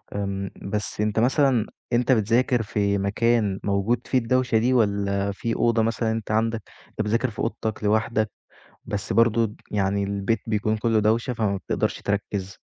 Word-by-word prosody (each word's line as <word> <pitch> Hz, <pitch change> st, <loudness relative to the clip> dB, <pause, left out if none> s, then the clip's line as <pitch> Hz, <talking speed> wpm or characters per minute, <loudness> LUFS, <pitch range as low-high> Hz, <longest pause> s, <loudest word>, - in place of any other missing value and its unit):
إمم، 100 Hz, -1 st, -2 dB
بس 105 Hz, +1 st, -3 dB
أنت 105 Hz, +1 st, +1 dB
مثلًا 125 Hz, -2 st, +3 dB, 0.3 s
أنت 125 Hz, +2 st, +3 dB
بتذاكر 120 Hz, +2 st, +2 dB
في 100 Hz, -1 st, 0 dB
مكان 105 Hz, 0 st, +1 dB
موجود 100 Hz, +4 st, 0 dB
فيه 130 Hz, -, +2 dB
الدوشة 125 Hz, 0 st, +2 dB
دي، 125 Hz, +4 st, +2 dB
والّا 100 Hz, -3 st, +1 dB
في 115 Hz, +4 st, -3 dB
أوضة 115 Hz, -1 st, +2 dB
مثلًا، 115 Hz, 0 st, 0 dB
أنت 110 Hz, -1 st, -3 dB
عندك 110 Hz, 0 st, +1 dB, 0.3 s
أنت -, -, -4 dB
بتذاكر 115 Hz, +4 st, +1 dB
في 110 Hz, -, -11 dB
أوضتك 110 Hz, -1 st, -3 dB
لوحدك، 110 Hz, +1 st, +1 dB, 0.5 s
بس 105 Hz, -2 st, -3 dB
برضه، 115 Hz, 0 st, +3 dB, 0.2 s
يعني، 100 Hz, -1 st, +1 dB
البيت 100 Hz, +3 st, -1 dB
بيكون 110 Hz, 0 st, 0 dB
كله 110 Hz, 0 st, +2 dB
دوشة، 115 Hz, +4 st, +1 dB
فما 105 Hz, -3 st, 0 dB
بتقدرش 95 Hz, -, -2 dB
تركِّز؟ 100 Hz, -2 st, -3 dB
110 Hz, 155 wpm, -24 LUFS, 100-115 Hz, 0.5 s, مثلًا